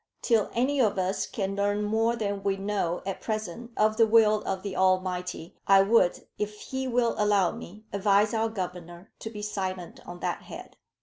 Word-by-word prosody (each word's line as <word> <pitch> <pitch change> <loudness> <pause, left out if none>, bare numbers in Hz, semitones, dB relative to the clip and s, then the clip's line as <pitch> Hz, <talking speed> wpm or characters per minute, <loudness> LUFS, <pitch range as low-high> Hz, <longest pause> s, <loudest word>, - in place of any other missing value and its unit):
Till 225 -4 +2
any 265 +4 +1
of 210 -4 +2
us 185 +1 -1
can 195 -4 -3
learn 205 +1 0
more 225 +2 +1
than 205 -3 -2
we 195 0 0
know 195 -3 -2
at 195 -1 -4
present 215 +1 -4
of 215 0 +3
the 225 -1 +5
will 215 -1 +5
of 190 -1 -2
the 200 -2 -4
Almighty, 185 -2 0
I 195 0 +7
would, 200 -3 +3
if 210 0 -3
he 265 0 -4
will 240 -1 +2
allow 205 -4 +3
me, 210 +5 -10
advise 200 +1 +3
our 225 0 +1
Governor 180 -3 -7
to 220 - -6
be 210 -2 -8
silent 190 -4 -4
on 175 0 -8
that - - -2
head. - - -10
205 Hz, 185 wpm, -27 LUFS, 185-220 Hz, -, I